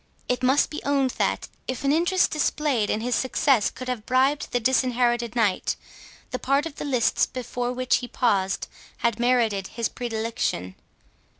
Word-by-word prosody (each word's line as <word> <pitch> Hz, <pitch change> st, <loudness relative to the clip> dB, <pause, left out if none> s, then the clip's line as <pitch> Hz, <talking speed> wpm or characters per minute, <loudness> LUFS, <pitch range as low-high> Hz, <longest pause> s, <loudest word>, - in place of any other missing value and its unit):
It 250 Hz, 0 st, 0 dB
must 260 Hz, +3 st, +3 dB
be 305 Hz, -, -5 dB
owned, 275 Hz, -2 st, +1 dB
that -, -, 0 dB, 0.2 s
if 255 Hz, 0 st, -4 dB
an 275 Hz, -, +2 dB
interest 350 Hz, +4 st, +2 dB
displayed 295 Hz, -7 st, 0 dB
in 215 Hz, -, 0 dB
his 245 Hz, +2 st, -1 dB
success 260 Hz, -3 st, +2 dB
could 255 Hz, -, -9 dB
have 250 Hz, -4 st, -3 dB
bribed 265 Hz, +3 st, +2 dB
the 245 Hz, -, +1 dB
Disinherited 240 Hz, -1 st, +1 dB
Knight, 210 Hz, -6 st, +1 dB, 0.6 s
the 255 Hz, -, -3 dB
part 275 Hz, +3 st, +1 dB
of 320 Hz, -3 st, -7 dB
the -, -, -4 dB
lists 255 Hz, -5 st, +2 dB
before 245 Hz, -1 st, -3 dB
which 255 Hz, 0 st, +1 dB
he 245 Hz, -, -6 dB
paused 200 Hz, -7 st, 0 dB, 0.4 s
had 235 Hz, -1 st, +1 dB
merited 230 Hz, -6 st, +2 dB
his 235 Hz, -1 st, -2 dB
predilection. 225 Hz, -, -3 dB
250 Hz, 165 wpm, -25 LUFS, 230-265 Hz, 0.6 s, must